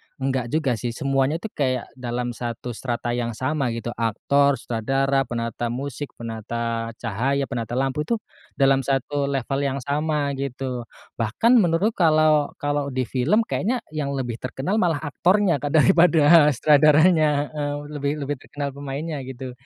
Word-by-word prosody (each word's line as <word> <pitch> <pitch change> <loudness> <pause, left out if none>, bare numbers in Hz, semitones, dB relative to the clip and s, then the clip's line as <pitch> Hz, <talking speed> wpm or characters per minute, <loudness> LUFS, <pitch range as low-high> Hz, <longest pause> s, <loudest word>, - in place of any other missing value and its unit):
enggak 130 -2 -2
juga 135 -4 0
sih, 120 -1 -4
semuanya 135 +2 +1
itu 205 +6 -6
kayak, 130 -3 -2
dalam 120 0 -3
satu 120 +1 -5
strata 120 0 -3
yang 120 -2 -2
sama 135 +1 -1
gitu. 115 0 -4
Aktor, 140 +6 +2
sutradara, 135 +3 0
penata 115 0 -3
musik, 135 +3 -5
penata 115 0 -4
cahaya, 125 +6 -1
penata 120 -2 -4
lampu, 135 +3 -1
itu 235 - +1 0.4
dalam 135 -1 +4
satu 140 +1 0
level 135 0 -1
yang 135 +1 -2
sama, 145 0 0
gitu. 130 -3 -4 0.3
Bahkan 225 - +3
menurut 175 +3 +2
kalau 155 -6 +3
kalau 145 -1 -1
di 130 -1 -1
film 135 - +1
kayaknya, 235 +3 -1
yang 145 -3 -3
lebih 120 -3 -3
terkenal 145 +11 -2
malah 165 -5 +1
aktornya, 175 +2 +2
kan, 145 +2 -2
daripada 165 -2 +6
sutradaranya 150 +1 +4
heeh, 145 -1 -3 0.2
lebih 140 0 0
lebih 145 -1 -3
terkenal 145 0 -5
pemainnya 140 +3 -5
gitu. 130 -1 -7
140 Hz, 145 wpm, -23 LUFS, 120-150 Hz, 0.4 s, daripada